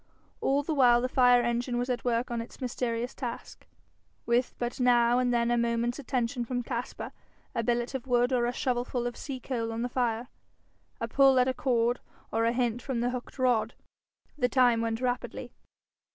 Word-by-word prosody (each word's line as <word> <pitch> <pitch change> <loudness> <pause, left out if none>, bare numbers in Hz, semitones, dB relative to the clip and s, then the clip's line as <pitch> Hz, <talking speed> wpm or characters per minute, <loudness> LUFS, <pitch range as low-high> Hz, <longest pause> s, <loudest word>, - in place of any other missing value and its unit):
All 280 +1 +1
the 315 - -2
while 245 -4 +5
the 250 - 0
fire 245 -1 +5
engine 240 +1 -1
was 245 +1 -1
at 250 -1 -2
work 240 0 0
on 235 -1 -1
its 230 - -11
mysterious 245 -1 -2
task, 245 -3 -7 0.6
with 240 +1 +1
but 240 +1 -3
now 245 -1 +4
and 250 -1 +1
then 235 0 +2
a 240 - +2
moment's 235 +2 0
attention 245 -2 -1
from 245 +1 -3
Caspar, 240 +1 -5 0.4
a - - 0
billet 240 +1 -1
of 265 -1 -5
wood 245 +1 +2
or 240 -1 +2
a - - 0
shovelful 245 -1 -1
of 240 -1 -3
sea 270 -3 -6
coal 230 -2 -3
on 225 +1 -3
the 245 - -2
fire, 240 -1 -1 0.7
a - - -2
pull 270 -1 +5
at 250 0 +4
a 260 - +1
cord, 240 -2 +1 0.3
or 225 +1 +1
a 230 - +3
hint 245 -1 0
from 255 -4 -2
the 245 +1 0
hooked 250 -1 -7
rod. 240 -3 +1 0.6
The 245 -2 +2
time 245 -2 +4
went 225 +1 -2
rapidly. 250 -1 -3
245 Hz, 195 wpm, -29 LUFS, 235-255 Hz, 0.7 s, while